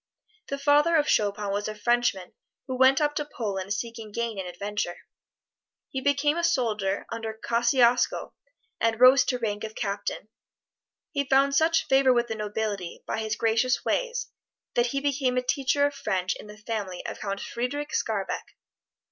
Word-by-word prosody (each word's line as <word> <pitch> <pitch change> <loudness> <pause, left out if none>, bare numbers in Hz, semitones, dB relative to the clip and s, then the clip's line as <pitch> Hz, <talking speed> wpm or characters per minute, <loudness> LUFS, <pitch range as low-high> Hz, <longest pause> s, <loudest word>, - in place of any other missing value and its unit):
The 280 - -3
father 295 +4 +4
of 300 -2 +3
Chopin 205 -1 +1
was 205 +1 -1
a 215 - -5
Frenchman 240 -4 0 0.3
who 260 - -4
went 260 +1 +5
up 295 -1 +1
to 295 -1 -3
Poland 200 -4 -3
seeking 225 0 -4
gain 230 -1 -3
and 185 - -4
adventure. 190 0 -3 0.9
He 265 - -3
became 285 +3 +2
a 340 - -1
soldier 210 -9 0
under 225 -1 -4
Kosciusko 240 +1 +2 0.5
and 230 -1 +2
arose 255 +4 +7
to 250 - 0
rank 210 -3 -3
of 220 0 -6
Captain. 200 +1 -3 0.8
He 280 -2 0
found 275 +1 +3
such 325 +3 +3
favor 270 -1 +4
with 240 -1 +1
the - - -1
nobility 210 -3 -4
by - - -2
his 220 -1 -2
gracious 230 +3 +1
ways - - -1 0.4
that 240 0 +2
he 275 +3 -2
became 270 -3 0
a 250 - +1
teacher 270 +3 +2
of 285 - 0
French 185 -9 -1
in - - -11
the 210 0 -11
family 210 -4 -5
of - - -5
Count 200 -1 -3
Frederic 285 +5 -3
Skarbek. 200 -4 -2
235 Hz, 165 wpm, -26 LUFS, 210-275 Hz, 0.9 s, arose